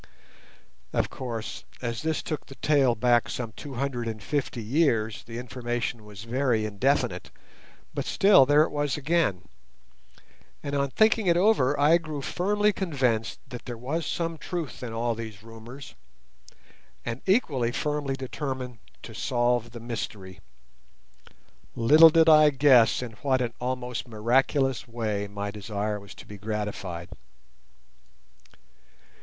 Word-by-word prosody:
Of - - 0
course, 115 -4 -5 0.2
as 115 -3 -3
this 160 -1 -1
took 155 -3 -5
the 135 - -11
tale 135 -5 +3
back 120 +1 +2
some 115 -3 -4
two 140 +4 -9
hundred 125 -2 -2
and 110 -1 -4
fifty 130 -1 -2
years, 115 -4 +1
the 115 0 -8
information 120 -2 -4
was 105 -1 -10
very 120 -2 0
indefinite; 125 +7 0 0.6
but - - -3
still 195 -10 +5
there 145 +1 +6
it - - -3
was 145 -2 -1
again, 145 - 0 1.2
and 140 - -4
on 140 -1 +1
thinking 220 - +3
it 170 -1 +4
over 160 -9 +3
I 155 +4 +5
grew 155 -4 -6
firmly 205 +5 +1
convinced 130 - -1
that 125 -1 -9
there 120 -1 -6
was 145 +8 -3
some 165 -2 -2
truth 170 -6 -5
in 125 -2 -5
all 115 +1 -1
these 110 -3 -8
rumours, 115 +4 -11 1.1
and 120 +1 -4
equally 145 - +2
firmly 145 0 -2
determined 130 -2 -5 0.2
to 115 - -9
solve 120 0 0
the 120 0 -9
mystery. 105 -5 -6 1.4
Little 155 +8 +8
did 160 0 +4
I 155 -1 +8
guess 130 -4 +5
in 120 - -6
what 135 -2 +2
an 120 -2 -2
almost 125 0 -3
miraculous 125 +3 +1
way 110 -3 -2
my 100 0 -5
desire 105 0 -3
was 100 0 -13
to - - -12
be 105 -1 -11
gratified. 105 -5 -4
125 Hz, 140 wpm, -26 LUFS, 115-145 Hz, 1.4 s, Little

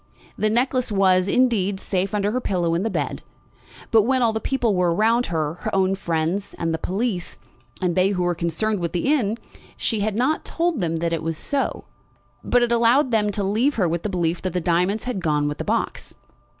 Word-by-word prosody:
The 215 - +1
necklace 250 +1 0
was, 190 -2 +3
indeed, 205 -5 +2
safe 195 +2 -2
under 205 0 0
her 255 +3 -1
pillow 175 -6 0
in 170 - 0
the 225 - -1
bed; - - -3 0.7
but 225 -2 +6
when 255 +3 +1
all 225 -1 +2
the 220 - -1
people 240 -3 0
were 180 -2 +2
around 225 +7 +2
her, 160 -1 -2
her - - -3
own 190 0 +2
friends, 175 +1 -2
and 165 -1 -1
the 160 - -2
police, 190 -1 -2 0.5
and 175 -2 +1
they 185 +1 +3
who 185 -3 -1
were 175 0 +1
concerned 175 +5 -1
with 170 -1 -3
the 225 - +1
inn, 225 -6 0 0.4
she 225 - 0
had 205 0 -1
not 260 +7 +1
told 335 -4 -1
them 165 -3 -1
that 165 +1 -1
it 165 - -1
was 165 0 -3
so, 280 - -2 0.6
but 245 0 +3
had 240 - 0
allowed 235 +3 +3
them 210 -2 +2
to 205 0 -2
leave 225 +9 +1
her 190 -6 +2
with 170 +1 -1
the 210 - -3
belief 175 -2 -1
that 185 -2 -3
the 180 - 0
diamonds 180 +5 +1
had 250 -6 -3
gone 150 -4 0
with 145 - -4
the - - -2
box. - - -2
195 Hz, 215 wpm, -23 LUFS, 175-230 Hz, 0.7 s, but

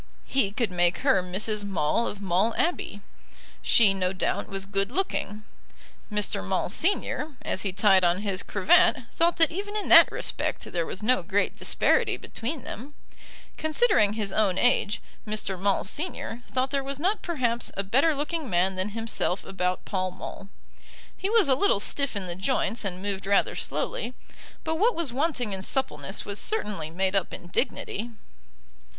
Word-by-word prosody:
He 265 -7 +1
could 215 0 -1
make 175 0 +2
her 265 -9 +4
Mrs. 205 +4 -2
Maule 195 +3 0
of 205 0 -6
Maule 195 +5 +1
Abbey. 320 - -1 0.6
She, 215 -4 +5
no 185 -1 0
doubt, 185 - -1
was 195 0 -4
good 195 0 -1
looking. 215 - -2 0.7
Mr. 210 - +1
Maule, 95 - -1
Senior, 315 - 0
as 190 - -1
he 195 - -2
tied 195 -1 +4
on 175 +3 +2
his 195 -3 -2
cravat, 350 - +4 0.2
thought 335 +1 +2
that 325 -1 +4
even 405 +4 -4
in 420 - -3
that - - +9
respect - - -2
there 170 -2 -3
was 195 - -4
no 250 +1 +3
great 200 +3 0
disparity - - +1
between 255 +3 -5
them. 280 +6 -8 0.6
Considering 315 - +3
his 210 -3 -2
own 200 -4 +2
age, 210 -3 +2 0.2
Mr. 210 -2 -1
Maule, 200 0 +2
Senior, 245 - -3
thought 260 +1 -1
there 275 -1 0
was 275 +1 -3
not 385 +7 +1
perhaps 245 -9 -1
a 195 - 0
better 275 +11 +3
looking 300 0 -3
man 180 +1 +2
than 185 +2 -1
himself 225 -4 -1
about 180 -1 -2
Pall 185 -2 -1
Mall. 190 +1 -9 0.7
He 385 - -3
was 445 -5 +4
a 270 - +4
little 265 - +2
stiff 280 +4 -1
in 200 -2 -2
the 175 - -1
joints 225 +4 -1
and 185 -1 -3
moved 195 -1 -3
rather 200 0 +3
slowly, 245 +2 -3 0.5
but 320 0 -2
what 465 +5 +3
was 325 -8 -2
wanting 260 -6 -1
in 190 - -2
suppleness 190 - -2
was 200 0 -3
certainly 205 - -2
made 190 +4 -1
up 195 -3 +1
in 175 - -9
dignity. 220 +5 -2
210 Hz, 170 wpm, -26 LUFS, 190-275 Hz, 0.7 s, that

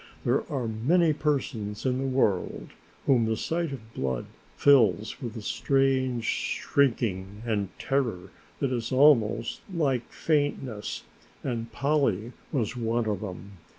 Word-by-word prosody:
There 130 +6 +1
are 130 -5 -1
many 155 +10 +3
persons 130 -9 -2
in 130 0 +1
the 135 - -1
world 120 -8 0 0.4
whom 120 -4 +4
the 110 0 0
sight 165 +3 -1
of 115 -4 -9
blood 65 -2 -2 0.3
fills 110 - +4
with 120 -2 -5
a 110 - -7
strange 130 -1 +1
shrinking 105 -9 0
and 105 -4 0
terror 120 -10 -1 0.3
that 135 - 0
is 115 -2 -2
almost 130 -5 +4
like 135 -9 0
faintness, 145 -8 -1 0.4
and 115 -3 -3
Polly 125 -6 +1 0.2
was 125 -6 -1
one 115 0 0
of 105 -3 -1
them. 100 -1 -7
120 Hz, 130 wpm, -27 LUFS, 110-140 Hz, 0.4 s, whom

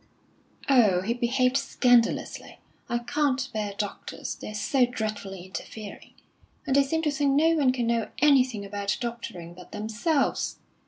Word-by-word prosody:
"Oh, 220 -10 +5
he 220 +5 -1
behaved 250 +2 +1
scandalously. 245 -4 +1 0.3
I 240 - +1
can't 270 +1 0
bear 210 -2 -3
doctors, 205 -2 -4
they're 215 - -8
so 250 +5 +2
dreadfully 205 -6 -5
interfering. 205 +2 -9 0.5
And 270 -2 +1
they 280 - +7
seem 320 +4 -1
to 300 - +2
think 285 -1 +1
no 310 +4 +4
one 295 -6 +3
can 250 -2 -1
know 230 -2 0
anything 255 -8 +3
about 200 0 -2
doctoring 230 -8 -6
but 180 0 -14
themselves! 230 +8 0
240 Hz, 145 wpm, -26 LUFS, 210-275 Hz, 0.5 s, they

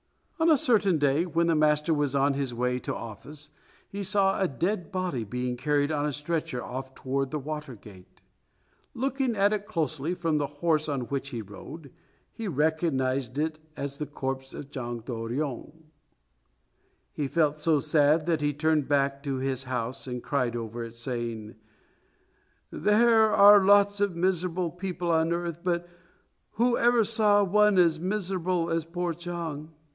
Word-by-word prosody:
On 325 +1 +4
a 310 - +6
certain 205 -9 +3
day 145 +4 +2
when 170 0 +1
the 165 - +2
master 150 +1 +3
was 145 -2 0
on 140 +1 +3
his 135 -2 -2
way 125 +1 0
to - - -4
office, 145 +7 -9 0.4
he 200 - -6
saw 195 0 +1
a 190 - +3
dead 175 - -2
body 185 -10 -2
being 125 +3 -3
carried 145 +3 0
on 150 -1 0
a - - -1
stretcher 150 -3 -3
off 130 +1 -7
toward 135 +1 -2
the 150 - -3
Water 150 -2 -6
Gate. 100 -3 -16 0.7
Looking 265 -1 -1
at 200 +1 +3
it 205 -1 -3
closely 160 -4 -2
from 165 -3 0
the 145 - -1
horse 155 +1 0
on 140 -3 -1
which 135 +2 -4
he 120 -5 -5
rode, 140 - -11 0.4
he 225 -2 -5
recognized 140 -5 0
it 155 +1 -1 0.2
as 140 0 -5
the 150 - -3
corpse 135 -2 -5
of 140 -1 -9
Chang 120 -3 -5
To 125 - -7
ryong. 130 +6 -4 1.3
He 145 - -2
felt 150 0 +1
so 155 -1 +2
sad 150 +2 +3
that 165 -3 0
he 145 0 +1
turned 150 0 +1
back 140 -1 +1
to 140 -2 -3
his 130 0 -2
house 125 0 -4
and 125 -1 -5
cried 125 -5 -1
over 115 0 -5
it, 115 0 -9
saying, 115 -2 -5 1.2
"There 220 +1 +4
are 205 0 +8
lots 205 +1 +4
of 200 -4 +1
miserable 180 -1 0
people 180 -1 -3
on 160 0 +2
earth, 170 -1 -2
but 175 -1 -1 0.7
who 240 +2 +2
ever 240 -1 +4
saw 210 -1 +4
one 210 +1 +3
as 165 -3 +4
miserable 180 -2 -1
as 165 0 0
poor 175 +1 -3
Chang? 165 -3 -6
155 Hz, 165 wpm, -27 LUFS, 135-180 Hz, 1.3 s, are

